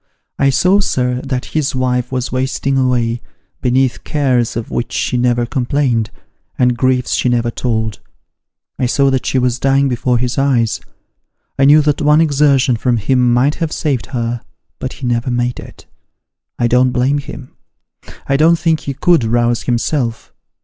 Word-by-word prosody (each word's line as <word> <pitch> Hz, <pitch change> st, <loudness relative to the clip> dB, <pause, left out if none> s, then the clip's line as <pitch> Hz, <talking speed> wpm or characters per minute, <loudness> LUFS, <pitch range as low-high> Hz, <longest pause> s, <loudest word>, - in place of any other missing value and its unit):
I 135 Hz, -, +4 dB
saw, 180 Hz, +9 st, +3 dB
sir, 125 Hz, -9 st, -1 dB
that 130 Hz, -2 st, -3 dB
his 150 Hz, -3 st, -1 dB
wife 125 Hz, -1 st, -1 dB
was 125 Hz, -1 st, -3 dB
wasting 135 Hz, +1 st, -1 dB
away, 120 Hz, -3 st, 0 dB, 0.4 s
beneath 130 Hz, 0 st, +1 dB
cares 130 Hz, -6 st, 0 dB
of 115 Hz, -, -5 dB
which 120 Hz, -, -3 dB
she -, -, -1 dB
never 120 Hz, -1 st, +1 dB
complained, 125 Hz, -3 st, 0 dB, 0.5 s
and 125 Hz, -1 st, +2 dB
griefs 130 Hz, 0 st, 0 dB
she 125 Hz, -, +1 dB
never 120 Hz, -1 st, 0 dB
told. 110 Hz, -3 st, -2 dB, 0.8 s
I 125 Hz, -, +1 dB
saw 135 Hz, +2 st, +2 dB
that 130 Hz, -1 st, -1 dB
she -, -, 0 dB
was 125 Hz, -1 st, 0 dB
dying 135 Hz, +1 st, +2 dB
before 125 Hz, -1 st, 0 dB
his 125 Hz, +3 st, -1 dB
eyes; 120 Hz, -6 st, +1 dB, 0.8 s
I 135 Hz, -, +5 dB
knew 150 Hz, +2 st, +6 dB
that 150 Hz, -1 st, 0 dB
one 150 Hz, +1 st, +4 dB
exertion 140 Hz, -5 st, +3 dB
from 120 Hz, +1 st, 0 dB
him 125 Hz, +3 st, +2 dB
might 130 Hz, +5 st, +2 dB
have 160 Hz, -2 st, -1 dB
saved 140 Hz, -7 st, -2 dB
her, 120 Hz, -1 st, -3 dB, 0.4 s
but 130 Hz, -, -5 dB
he 130 Hz, -, -8 dB
never 120 Hz, 0 st, -1 dB
made 120 Hz, 0 st, -1 dB
it. -, -, -12 dB, 0.7 s
I 120 Hz, -, 0 dB
don't 125 Hz, +2 st, +3 dB
blame 130 Hz, +3 st, +1 dB
him: 135 Hz, -2 st, -10 dB, 0.7 s
I 140 Hz, -, +1 dB
don't 165 Hz, +3 st, +4 dB
think 160 Hz, -2 st, 0 dB
ho 140 Hz, -, -3 dB
could 170 Hz, -6 st, +3 dB
rouse 120 Hz, +1 st, +1 dB
himself. 120 Hz, -1 st, -2 dB
125 Hz, 165 wpm, -16 LUFS, 120-140 Hz, 0.8 s, knew